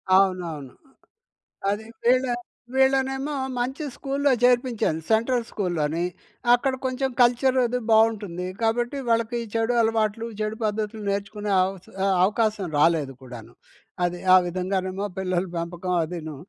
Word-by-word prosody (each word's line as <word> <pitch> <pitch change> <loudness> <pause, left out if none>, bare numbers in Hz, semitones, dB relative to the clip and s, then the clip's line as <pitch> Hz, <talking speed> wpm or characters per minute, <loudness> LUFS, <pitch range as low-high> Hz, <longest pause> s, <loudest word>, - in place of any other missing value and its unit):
అవునవును. 175 -8 +1 1.0
అది 210 +2 -2 0.2
వీళ్ళ 255 +2 +4 0.5
వీళ్ళనేమో 265 +2 +2 0.2
మంచి 265 +5 -2
స్కూల్లో 280 +1 0
చేర్పించాను 240 -9 +2
సెంట్రల్ 230 +2 +2
స్కూల్లోని 170 -4 -1 0.5
అక్కడ 260 +2 +2
కొంచెం 260 +1 0
కల్చరది 250 0 +3
బావుంటుంది. 210 -5 +2
కాబట్టి 240 +4 0
వాళ్ళకి 230 +1 +1
చెడు 225 +1 +1
అలవాట్లు, 225 0 0
చెడు 215 +1 -2
పద్ధతులు 215 0 -2
నేర్చుకునే 200 +1 -3
అవస్ 190 0 -3 0.2
ఆహ్, 195 -1 +3
అవకాశం 210 -1 +1
రాలేదు 150 -4 +2
కూడాను. 120 -2 -10 0.5
అది 175 0 -3 0.2
ఆ - - +10
విధంగానేమో 185 +2 -2
పిల్లల 185 -1 0
పెంపకం 175 +2 -3
అదీను 160 -3 -6
215 Hz, 115 wpm, -24 LUFS, 180-245 Hz, 1.0 s, ఆ